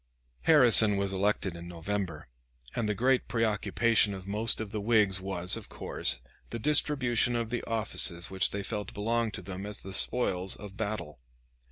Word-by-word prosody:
Harrison 115 Hz, -9 st, +7 dB
was 100 Hz, 0 st, -1 dB
elected 95 Hz, -2 st, -1 dB
in 85 Hz, 0 st, -9 dB
November, 85 Hz, -1 st, -5 dB, 0.5 s
and 110 Hz, -3 st, -1 dB
the 105 Hz, -, -1 dB
great 130 Hz, +4 st, +1 dB
preoccupation 110 Hz, -1 st, +1 dB
of 95 Hz, -1 st, -10 dB
most 105 Hz, +3 st, 0 dB
of 110 Hz, -2 st, -6 dB
the 105 Hz, -, -4 dB
Whigs 105 Hz, -3 st, +2 dB
was, 95 Hz, -1 st, 0 dB
of 115 Hz, -3 st, -8 dB
course, -, -, +1 dB, 0.3 s
the 115 Hz, -, -5 dB
distribution 130 Hz, -3 st, +2 dB
of 115 Hz, -1 st, -3 dB
the 120 Hz, -, -3 dB
offices 100 Hz, -6 st, 0 dB
which 95 Hz, 0 st, +1 dB
they 100 Hz, 0 st, -5 dB
felt 105 Hz, 0 st, -5 dB
belonged 115 Hz, +1 st, -1 dB
to 95 Hz, -, -7 dB
them 95 Hz, +1 st, -7 dB
as 105 Hz, 0 st, -7 dB
the 95 Hz, -, -8 dB
spoils 95 Hz, -4 st, +1 dB
of 100 Hz, -1 st, -11 dB
battle. 100 Hz, -, -5 dB
105 Hz, 170 wpm, -29 LUFS, 95-115 Hz, 0.5 s, Harrison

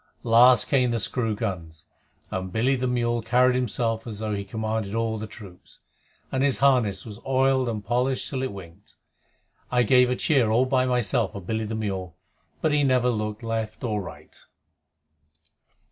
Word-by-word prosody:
Last 120 Hz, +2 st, +6 dB
came 130 Hz, -3 st, +2 dB
the 120 Hz, -, 0 dB
screw 115 Hz, 0 st, -1 dB
guns, 85 Hz, -7 st, -5 dB, 0.5 s
and 95 Hz, 0 st, -4 dB
Billy 125 Hz, +7 st, +1 dB
the 130 Hz, 0 st, -1 dB
mule 120 Hz, -1 st, 0 dB
carried 125 Hz, +3 st, +3 dB
himself 115 Hz, -2 st, -1 dB
as 110 Hz, -3 st, -6 dB
though 110 Hz, 0 st, -3 dB
he 100 Hz, -1 st, -3 dB
commanded 110 Hz, 0 st, -3 dB
all 115 Hz, -1 st, -1 dB
the 110 Hz, -, -5 dB
troops, 100 Hz, -4 st, -13 dB, 0.5 s
and 130 Hz, -, -1 dB
his 140 Hz, -1 st, +2 dB
harness 125 Hz, -8 st, +2 dB
was 105 Hz, -1 st, -9 dB
oiled 130 Hz, -1 st, +2 dB
and 105 Hz, -3 st, -5 dB
polished 125 Hz, +3 st, 0 dB
till 130 Hz, -2 st, -3 dB
it 130 Hz, -, -2 dB
winked. 95 Hz, 0 st, -12 dB, 0.8 s
I 125 Hz, -1 st, +3 dB
gave 125 Hz, +2 st, +4 dB
a 125 Hz, -, +1 dB
cheer 130 Hz, -3 st, +2 dB
all 120 Hz, +4 st, +3 dB
by 130 Hz, -1 st, +1 dB
myself 120 Hz, -3 st, 0 dB
for 100 Hz, -, -7 dB
Billy 110 Hz, +4 st, -2 dB
the 110 Hz, +1 st, -4 dB
mule, 95 Hz, -5 st, -4 dB, 0.4 s
but 160 Hz, -, +1 dB
he 145 Hz, -1 st, +2 dB
never 125 Hz, -2 st, +3 dB
looked 105 Hz, 0 st, -4 dB
right 115 Hz, 0 st, -4 dB
or 105 Hz, -4 st, -1 dB
left. 90 Hz, -, -12 dB
115 Hz, 175 wpm, -25 LUFS, 105-125 Hz, 0.8 s, Last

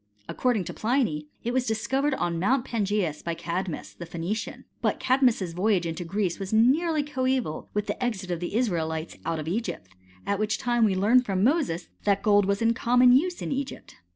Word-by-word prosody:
According 245 Hz, -6 st, 0 dB
to -, -, -6 dB
Pliny, 215 Hz, -, 0 dB, 0.2 s
it 240 Hz, -, -2 dB
was 255 Hz, -1 st, 0 dB
discovered 265 Hz, +6 st, 0 dB
on 170 Hz, -8 st, -1 dB
Mount 245 Hz, +7 st, +2 dB
Pangseus 205 Hz, -, -1 dB
by 170 Hz, -1 st, -3 dB
Cadmus, 175 Hz, +1 st, -4 dB
the 170 Hz, -, -9 dB
Phoenician: 175 Hz, +6 st, -4 dB, 0.2 s
but -, -, 0 dB
Cadmus's 245 Hz, -9 st, +2 dB
voyage 185 Hz, 0 st, +1 dB
into 165 Hz, +1 st, -3 dB
Greece 185 Hz, +1 st, -2 dB
was 195 Hz, -1 st, -5 dB
nearly 290 Hz, +8 st, +3 dB
coeval 260 Hz, -, -2 dB
with 210 Hz, 0 st, 0 dB
the 250 Hz, -, -3 dB
exit 195 Hz, -7 st, -2 dB
of 175 Hz, -, -2 dB
the 175 Hz, +3 st, -4 dB
Israelites 165 Hz, -8 st, -1 dB
out 165 Hz, -1 st, 0 dB
of 155 Hz, 0 st, -5 dB
Egypt, 175 Hz, -, -3 dB, 0.4 s
at 200 Hz, 0 st, -1 dB
which 215 Hz, 0 st, 0 dB
time 240 Hz, -2 st, +2 dB
we 195 Hz, -3 st, +2 dB
learn 215 Hz, +7 st, +4 dB
from 195 Hz, -5 st, -1 dB
Moses 245 Hz, -, +1 dB, 0.2 s
that 200 Hz, -1 st, +1 dB
gold 205 Hz, -1 st, +4 dB
was 200 Hz, +3 st, 0 dB
in 230 Hz, 0 st, +4 dB
common 245 Hz, +2 st, +4 dB
uae 355 Hz, +6 st, +1 dB
in -, -, -3 dB
Egypt. 275 Hz, 0 st, -5 dB
210 Hz, 190 wpm, -26 LUFS, 175-250 Hz, 0.4 s, learn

